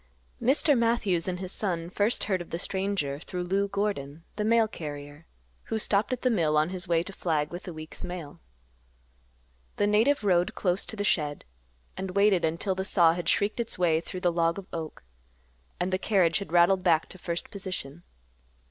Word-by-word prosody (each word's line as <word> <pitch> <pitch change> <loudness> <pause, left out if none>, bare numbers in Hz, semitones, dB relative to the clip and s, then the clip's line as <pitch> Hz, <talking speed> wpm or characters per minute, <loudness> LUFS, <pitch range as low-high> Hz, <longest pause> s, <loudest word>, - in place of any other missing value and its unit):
Mr. 280 +3 +4
Matthews 230 -8 +1
and 180 -1 -2
his 185 -1 -4
son 175 -6 -1
first 210 +5 +1
heard 190 -3 0
of 175 - -9
the 170 - -3
stranger 190 -7 -2
through 180 +2 -5
Lou 195 +3 0
Gordon, 195 -7 -3
the 210 - -1
mail 225 +1 +4
carrier, 145 -4 -8 0.4
who 225 - -2
stopped 210 +1 +1
at 255 - -3
the 255 - +3
mill 160 -8 +2
on 155 +2 +3
his 185 0 -5
way 170 -1 +2
to 195 - -9
Flag 155 -5 -1
with 175 +1 -7
the 180 - -5
week's 155 0 -7
mail. 175 -5 -7 1.4
The 205 - +1
native 220 +6 +3
rode 180 -3 +2
close 180 0 0
to - - -5
the 205 - -2
shed, 150 -7 0 0.5
and 190 -1 -5
waited 200 -3 +4
until 165 +5 0
the 190 0 -3
saw 170 -4 +4
had 175 0 -2
shrieked 205 +3 +1
its 235 - -3
way 165 -3 +2
through 180 +1 -7
the 175 -2 +2
log 170 0 +1
of 195 - -7
oak, 160 - -6 0.8
and 180 +1 -1
the 185 - +1
carriage 185 -6 +3
had 200 - -7
rattled 175 +2 +5
back 165 -3 +3
to 185 - -8
first 170 -1 -4
position. 185 -6 -6
180 Hz, 190 wpm, -28 LUFS, 165-200 Hz, 1.4 s, rattled